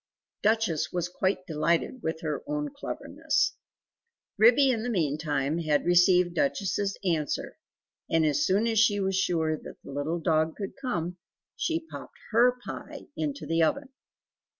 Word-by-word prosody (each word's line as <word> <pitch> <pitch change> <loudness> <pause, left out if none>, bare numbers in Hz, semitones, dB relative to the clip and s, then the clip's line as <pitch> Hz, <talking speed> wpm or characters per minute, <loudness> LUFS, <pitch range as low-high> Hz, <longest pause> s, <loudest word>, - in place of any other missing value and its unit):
Duchess 210 -8 +1
was 175 -1 -1
quite 185 +1 -1
delighted 165 +9 0
with 160 -3 -3
her 155 -2 -2
own 295 0 -2
cleverness! 480 +10 -1 0.8
Ribby 245 +6 +6
in 230 -3 -1
the 245 - -3
meantime 155 - 0
had 155 -3 +1
received 175 0 +4
Duchess's 200 -5 0
answer, 160 -5 -1 0.5
and 165 -1 +3
as 145 -1 +2
soon 200 +6 +2
as 225 -2 +2
she 205 -2 +4
was 190 -1 0
sure 165 -4 +1
that - - -11
the - - -9
little 145 +5 -2
dog 160 0 +1
would 195 -2 -4
come 180 -9 -2 0.4
she 330 0 0
popped - - -9
HER 245 +2 +4
pie - - -8
into 290 -2 -3
the 165 0 +1
oven. 270 - +1
180 Hz, 150 wpm, -28 LUFS, 160-225 Hz, 0.8 s, Ribby